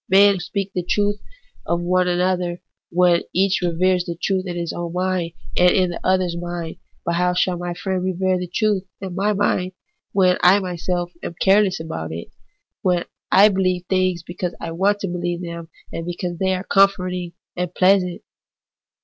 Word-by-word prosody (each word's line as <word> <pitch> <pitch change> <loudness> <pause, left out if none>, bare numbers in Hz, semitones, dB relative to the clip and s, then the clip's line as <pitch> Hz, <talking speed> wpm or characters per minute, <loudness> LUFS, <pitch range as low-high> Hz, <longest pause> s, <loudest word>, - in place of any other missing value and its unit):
Men 195 0 +6
speak 195 +2 -3
the 180 - -1
truth 205 +3 0 0.5
to 170 - +2
one 180 +1 +1
another 180 -1 0 0.3
when 175 -1 +4
each 190 +1 +2
reveres 180 +1 +2
the 170 -1 -5
truth 190 -1 0
in 175 - -4
his 170 -1 -3
own 170 -1 -4
mind 180 -2 -1 0.2
and 180 0 +6
in 180 -1 +2
the 175 - -5
other's 185 -2 +1
mind; 175 -1 -5 0.3
but 170 - 0
how 180 +1 +1
shall 180 0 +2
my 175 0 -4
friend 185 0 -2
revere 185 0 0
the 180 - -4
truth 210 -1 +1 0.2
in 190 -2 -6
my 200 +3 +1
mind 185 -2 0 0.4
when 185 -2 +3
I 180 +3 +7
myself 175 -1 -3
am 170 - -6
careless 195 -1 +4
about 85 - -5
it, 85 +1 -6 0.5
when 180 -2 +1 0.3
I 205 +2 +7
believe 185 -2 0
things 185 -2 +1
because 175 +1 -4
I 165 - -5
want 200 +5 +1
to 195 - -1
believe 175 0 -3
them, 170 -1 -7 0.2
and 165 - -4
because 175 0 -4
they 190 -1 +2
are 185 - -4
comforting 185 -3 +2 0.2
and 180 -1 -2
pleasant 185 -1 +2
180 Hz, 175 wpm, -21 LUFS, 175-190 Hz, 0.5 s, I